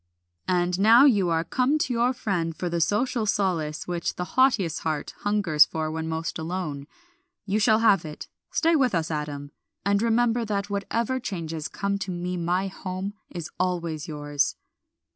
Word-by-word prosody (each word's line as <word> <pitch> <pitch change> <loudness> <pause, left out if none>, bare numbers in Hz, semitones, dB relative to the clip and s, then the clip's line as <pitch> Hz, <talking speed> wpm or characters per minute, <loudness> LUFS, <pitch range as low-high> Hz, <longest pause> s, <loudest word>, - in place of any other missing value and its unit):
"And 180 0 +1
now 230 +6 +7
you 205 -10 +4
are 165 0 +1
come 260 - +1
to 260 -4 -1
your 240 +1 +2
friend 180 -10 -2
for 175 +2 -3
the 170 0 -1
social 220 +5 +1
solace 170 -7 -1
which 175 -1 -2
the 180 - -3
haughtiest 220 - +3
heart 155 -2 -3
hungers 195 -7 +4
for 155 -1 -3
when 160 0 -3
most 160 0 -3
alone. 160 -4 -4 0.6
You 205 +1 0
shall 215 0 +4
have 200 -6 +4
it. 155 -2 -8 0.2
Stay 330 0 +2
with 260 - +2
us, 165 0 -1
Adam, 145 -2 -4 0.3
and 200 0 +2
remember 235 +1 +2
that 205 -2 -2
whatever 230 +6 -1
changes 165 -8 -4
come 200 0 -2
to 195 - -4
me 180 0 -3
my 175 +2 0
home 190 +1 -5 0.2
is 170 -3 -7
always 170 -4 -1
yours." 145 -2 -1
185 Hz, 165 wpm, -26 LUFS, 160-215 Hz, 0.6 s, now